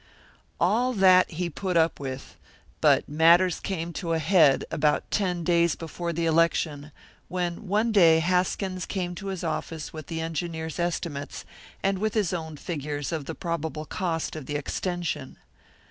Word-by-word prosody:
All 230 Hz, +9 st, +2 dB
that 185 Hz, -3 st, +5 dB
he 175 Hz, +2 st, -3 dB
put 180 Hz, +2 st, -2 dB
up 165 Hz, -1 st, +2 dB
with; 135 Hz, -1 st, -6 dB, 0.5 s
but -, -, +4 dB
matters 170 Hz, +4 st, +4 dB
came 170 Hz, -3 st, -4 dB
to 165 Hz, -2 st, -2 dB
a -, -, +2 dB
head 160 Hz, -4 st, +4 dB
about 150 Hz, 0 st, +1 dB
ten 180 Hz, -4 st, 0 dB
days 170 Hz, -1 st, +3 dB
before 170 Hz, +1 st, -5 dB
the 170 Hz, 0 st, -1 dB
election, 155 Hz, -2 st, +1 dB, 0.4 s
when 180 Hz, +2 st, -3 dB
one 215 Hz, +4 st, +2 dB
day 170 Hz, -6 st, +6 dB
Haskins 185 Hz, +2 st, 0 dB
came 180 Hz, -2 st, -3 dB
to 195 Hz, +3 st, -7 dB
his 190 Hz, -3 st, -4 dB
office 160 Hz, -3 st, -4 dB
with 155 Hz, -2 st, -8 dB
the 165 Hz, -1 st, -4 dB
engineers' 160 Hz, 0 st, -4 dB
estimates, 170 Hz, -4 st, -3 dB, 0.4 s
and 195 Hz, -1 st, +1 dB
with 215 Hz, +1 st, -1 dB
his 205 Hz, -5 st, +1 dB
own 160 Hz, -3 st, -4 dB
figures 145 Hz, -3 st, -4 dB
of 160 Hz, -4 st, -3 dB
the -, -, -5 dB
probable 160 Hz, -3 st, -3 dB
cost 165 Hz, -1 st, -2 dB
of 155 Hz, -4 st, -7 dB
the 145 Hz, -, -3 dB
extension. 170 Hz, -1 st, -3 dB
170 Hz, 160 wpm, -26 LUFS, 160-185 Hz, 0.5 s, day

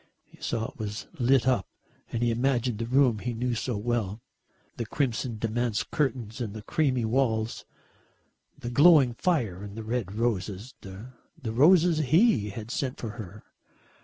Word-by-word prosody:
He -, -, -22 dB
saw 115 Hz, -1 st, -2 dB
it -, -, -25 dB
was 105 Hz, +1 st, -4 dB
lit 130 Hz, 0 st, +3 dB
up 125 Hz, -8 st, +2 dB, 0.4 s
and 115 Hz, -, -1 dB
he 120 Hz, -, +2 dB
imagined 120 Hz, -1 st, 0 dB
the 115 Hz, -, -2 dB
room 125 Hz, -3 st, +3 dB
he 120 Hz, +2 st, -3 dB
knew 125 Hz, +2 st, -1 dB
so 115 Hz, 0 st, -2 dB
well. 110 Hz, -2 st, -2 dB, 0.6 s
The 115 Hz, -, -3 dB
crimson 120 Hz, -4 st, -1 dB
damask 115 Hz, +1 st, -1 dB
curtains 125 Hz, -5 st, -1 dB
and 110 Hz, -3 st, -4 dB
the 110 Hz, -, -7 dB
creamy 130 Hz, -3 st, +1 dB
walls, 110 Hz, -2 st, 0 dB, 0.9 s
the 120 Hz, -, -6 dB
glowing 145 Hz, -2 st, +6 dB
fire 115 Hz, -, 0 dB
and 100 Hz, +1 st, -8 dB
the 110 Hz, -, -5 dB
red 110 Hz, -4 st, -3 dB
roses, 110 Hz, 0 st, -2 dB
the 100 Hz, +6 st, -10 dB, 0.3 s
roses 155 Hz, +8 st, +4 dB
he 155 Hz, -, +3 dB
had 110 Hz, +3 st, -7 dB
sent 130 Hz, -2 st, -2 dB
for 115 Hz, -, -5 dB
her. 105 Hz, -2 st, -9 dB
120 Hz, 160 wpm, -27 LUFS, 110-130 Hz, 0.9 s, glowing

